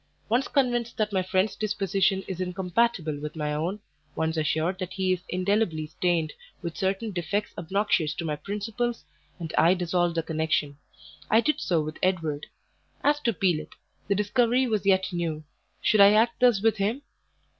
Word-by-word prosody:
Once 240 +4 +2
convinced 240 -4 0
that 215 -1 0
my 190 - +2
friend's 190 +2 0
disposition 195 -2 0
is 185 -1 -4
incompatible 180 -3 0
with 150 +2 -6
my 150 -1 -2
own, 170 +7 -2 0.4
once 160 0 -1
assured 160 +3 0
that 185 -1 -4
he 185 -1 +1
is 180 - -4
indelibly 185 -3 0
stained 160 0 -1 0.3
with 170 -1 -4
certain 195 +3 -1
defects 195 +3 -2
obnoxious 175 -3 0
to 170 - -4
my 150 -2 -1
principles, 215 +7 -3 0.3
and 165 -3 -6
I 170 +3 +5
dissolve 175 -1 0
the 165 - 0
connection. 155 -3 -1 0.5
I 220 - +5
did 305 +6 +1
so 170 -4 +1
with 155 +1 -6
Edward. 165 -6 0 0.6
As 290 0 +3
to 240 -5 +1
Pelet, 175 -5 -1 0.3
the 200 - +2
discovery 240 +5 +2
was 215 -4 -1
yet 190 -1 +3
new; 165 -3 -2 0.4
should 215 -2 +4
I 200 +1 +8
act 230 +3 +3
thus 240 -5 +4
with 225 -1 +3
him? 220 +8 -1
190 Hz, 165 wpm, -26 LUFS, 165-215 Hz, 0.6 s, I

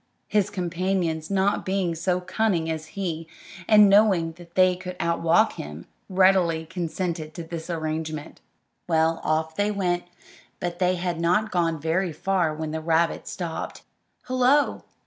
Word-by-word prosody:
His 210 -2 +1
companions, 175 -4 -1
not 200 +1 +1
being 190 -3 0
so 180 +2 -1
cunning 180 -3 0
as 160 0 -5
he, 165 -4 -3 0.4
and 210 -1 +7
knowing 195 -5 +4 0.2
they 185 -1 +5
could 180 0 -7
outwalk 170 0 +2
him, 75 +3 -7 0.2
readily 185 -4 +3
consented 165 -1 -4
to 170 - -5
this 165 0 -7
arrangement. 155 -2 -4 0.5
Well, 165 -1 +2
off 160 +1 0
they 205 +1 +1
went; 180 -4 -1 0.5
but 175 -1 -4
they 180 0 +2
had 175 -1 -2
not 210 +6 +2
gone 165 -3 +1
very 165 +3 0
far 185 -2 0
when 155 0 -4
the 160 0 -3
rabbit 165 +1 +1
stopped. 170 -3 -5 0.4
"Hullo!" 255 +3 +2
175 Hz, 140 wpm, -25 LUFS, 160-190 Hz, 0.5 s, and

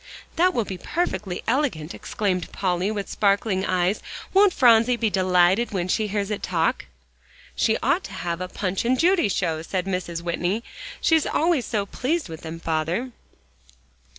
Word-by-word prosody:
"That 365 +2 +3
will 230 - +1
be 185 -2 -6
perfectly 215 - -2
elegant," 230 - 0
exclaimed 185 -5 -2
Polly, 185 0 0
with 205 -2 -3
sparkling 200 -1 +1
eyes. 185 +1 +1 0.3
"Won't 395 0 +6
Phronsie 240 -3 +5
be 230 -2 0
delighted 185 +4 +3
when 180 -2 -1
she 215 +3 0
hears 205 0 -2
it 210 - -3
talk?" 165 -3 0 0.7
"She 220 - +2
ought 285 +9 +2
to - - -9
have 170 +1 -3
a 185 - -3
Punch 185 0 -2
and 255 +2 +1
Judy 345 - +3
show," 160 -4 -1
said 180 +2 -3
Mrs. 180 -3 -3
Whitney, 180 +5 -1 0.4
"she's 320 -2 +3
always 320 -5 +1
so 210 -3 -1
pleased 275 - -2
with 160 -1 -8
them, 165 0 -7
father." 165 +10 -1
200 Hz, 160 wpm, -24 LUFS, 180-240 Hz, 0.7 s, Won't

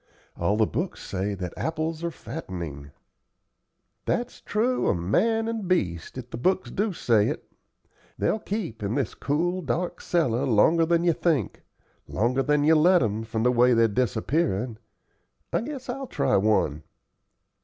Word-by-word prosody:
All 100 +5 0
the 110 - +4
books 165 - -4
say 100 +1 -2
that 90 -2 -5
apples 160 0 -3
are 170 - 0
fattening." 85 - -7 1.2
"That's 245 +1 -2
true 240 +4 0
of 90 - +2
man 225 - +1
and 225 -4 -3
beast, 90 - -1
if 125 -1 -8
the - - -5
books 185 +7 +1
do 205 +2 0
say 115 - +2
it. - - -4 0.7
They'll 220 - +1
keep 195 - -4
in 105 +3 -2
this 135 -5 -1
cool, 175 +6 -1
dark 170 +4 -2
cellar 140 -6 +1
longer 160 +9 +4
than 170 0 +2
you'd 170 -2 +1
think 155 - 0 0.5
longer 120 +6 +1
than 145 +1 +2
you'll 155 0 +5
let 180 -1 +5
'em, 110 0 -1
from 110 0 -3
the 125 - +4
way 125 0 +4
they're 115 0 +5
disappearin'. 115 - 0 0.7
I - - +2
guess 270 +1 -6
I'll 265 +2 -4
try - - +1
one." 95 -7 +2
135 Hz, 155 wpm, -26 LUFS, 110-175 Hz, 1.2 s, you'll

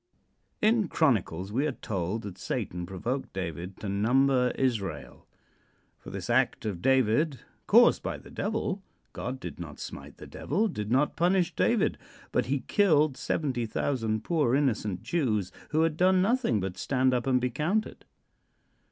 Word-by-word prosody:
In 215 -2 +4
Chronicles 100 - +1
we 135 +7 +1
are - - 0
told 100 0 -3
that 95 -2 -8
Satan 90 -1 -3
provoked 120 +9 -4
David 90 0 -5
to 105 - -4
number 125 +6 +3
Israel. 100 - -2 0.7
For - - -11
this - - -6
act - - +1
of 95 -5 -3
David, 130 - +2 0.3
caused 235 +3 +6
by - - -3
the - - -14
Devil, 205 -2 -2 0.3
God 130 +1 -4
did - - -7
not 80 -4 -8
smite - - -8
the - - -10
Devil, 205 +10 -1
did 105 - -4
not 135 +5 +2
punish 180 +1 +2
David, - - +2 0.3
but - - +1
he 135 +1 0
killed 155 - +3
70,000 120 -5 -1
poor 150 -8 +2
innocent 110 -9 0
Jews 110 - 0 0.2
who 155 +1 +2
had 160 -1 0
done 185 +1 +4
nothing 220 - +2
but 95 -1 -4
stand 130 -1 +1
up 125 +1 -1
and 130 -1 +3
be 125 0 -1
counted. 180 - -1
130 Hz, 150 wpm, -28 LUFS, 105-160 Hz, 0.7 s, caused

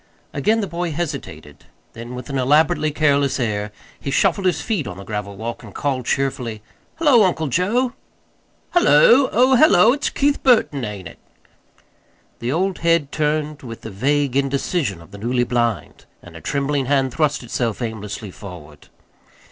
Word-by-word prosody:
Again 225 +1 +1
the 200 - -2
boy 175 0 -3
hesitated; 140 - -6 0.3
then, 120 +2 -8
with 125 - -8
an 135 - -1
elaborately 150 +3 +3
careless 140 -2 +1
air, 105 -3 -2 0.3
he - - -5
shuffled 190 +5 +2
his 170 -4 +1
feet 195 - -2
on 90 -2 -7
the 100 - -9
gravel 100 -1 -5
walk 115 +2 -5
and 105 -5 -13
called 130 -4 -2
cheerfully: 125 -6 -2 0.3
"Hullo, 290 -8 +4
Uncle 170 -4 +1
Joe." 230 - +1 0.8
"Hullo! 260 - +5
Oh, 255 +4 +4
hullo! 225 - +6
It's 285 - -1
Keith 280 0 0
Burton, 220 - +3
ain't 105 -5 -6
it?" - - -14 1.2
The 120 +2 -2
old 185 +4 -1
head 165 -4 +1
turned 150 -1 -1
with 115 -3 -9
the 110 - -8
vague 135 +6 0
indecision 135 - -1
of 85 - -19
the 100 - -10
newly 120 +3 0
blind, 120 -2 -2 0.2
and 85 -1 -13
a 80 - -10
trembling 140 - -1
hand 135 -2 +1
thrust 150 -4 0
itself 115 -2 -2
aimlessly 110 -3 -5
forward. 85 -7 -12
140 Hz, 160 wpm, -20 LUFS, 115-170 Hz, 1.2 s, hullo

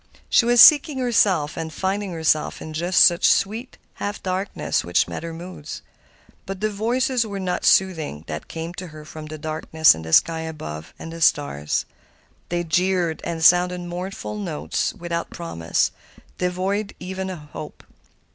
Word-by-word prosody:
She 240 - +5
was 240 0 +4
seeking 295 -1 +8
herself 205 - +2
and 160 -1 -5
finding 195 +3 -2
herself 160 -2 0
in 155 - -8
just 175 +4 +4
such 175 +1 +4
sweet, 225 +5 0 0.2
half 205 0 -5
darkness 185 - -1
which 85 0 +2
met - - -5
her 165 0 -6
moods. 165 -2 -8 0.6
But 195 0 -5
the 215 +1 0
voices 245 +4 0
were 200 -3 -5
not 185 -1 -2
soothing 160 - +2
that 75 - -6
came 165 +1 -6
to 180 - -7
her 155 -1 -11
from 155 0 -9
the 155 0 -7
darkness 160 +1 +3
and 80 - -8
the 80 - -7
sky 165 - +4
above 80 - -7
and 165 - -8
the 165 - -8
stars. 75 - +1 0.6
They 175 0 -1
jeered 175 0 0
and 165 -1 -3
sounded 180 +1 +5
mournful 175 - -5
notes 80 -6 -2
without 170 -1 -4
promise, 85 - -1 0.5
devoid 190 +3 -1
even 190 +1 -5
of 155 -5 -8
hope. 150 - -9
175 Hz, 160 wpm, -23 LUFS, 155-190 Hz, 0.6 s, seeking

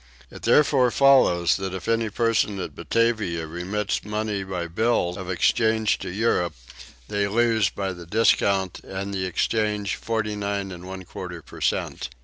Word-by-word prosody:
It - - -11
therefore 135 -4 +4
follows 125 -11 +4
that 95 -1 -4
if 95 - -7
any 115 -1 +1
person 110 -2 +1
at - - -5
Batavia 110 -8 0
remits 90 +6 -3
money 105 -1 -2
by 90 -2 -4
bills 90 0 0
of 95 -2 -7
exchange 110 +4 +2
to - - -5
Europe 95 -3 0 0.5
they 100 -1 0
lose 110 -1 +2
by 95 -1 -3
the 85 -1 -11
discount 100 -2 +2
and 100 +1 -6
the 95 -1 -1
exchange 105 +2 0
49 105 -3 -2
1/4 90 -1 -8
per - - -12
cent. - - -1
100 Hz, 140 wpm, -24 LUFS, 95-110 Hz, 0.5 s, therefore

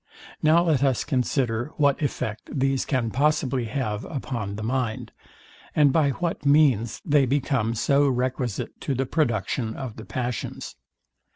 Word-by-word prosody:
Now 160 +3 +5
let 155 -5 +2
us 135 -4 +2
consider 125 -1 -1
what 145 -1 +2
effect 110 -6 -3
these 135 -2 0
can 125 -5 0
possibly 135 -2 +1
have 110 -2 -3
upon 115 -8 -4
the 110 - -5
mind, 120 -1 -2 0.6
and 145 -3 +5
by 150 -2 +3
what 165 +5 -3
means 140 -6 +3
they 145 -3 +3
become 125 -4 0
so 140 +5 +3
requisite 125 -3 -2
to 140 - -1
the 135 +2 0
production 120 -5 -1
of 130 -5 -6
the 110 - -8
passions. 125 -2 -4
130 Hz, 145 wpm, -25 LUFS, 115-145 Hz, 0.6 s, Now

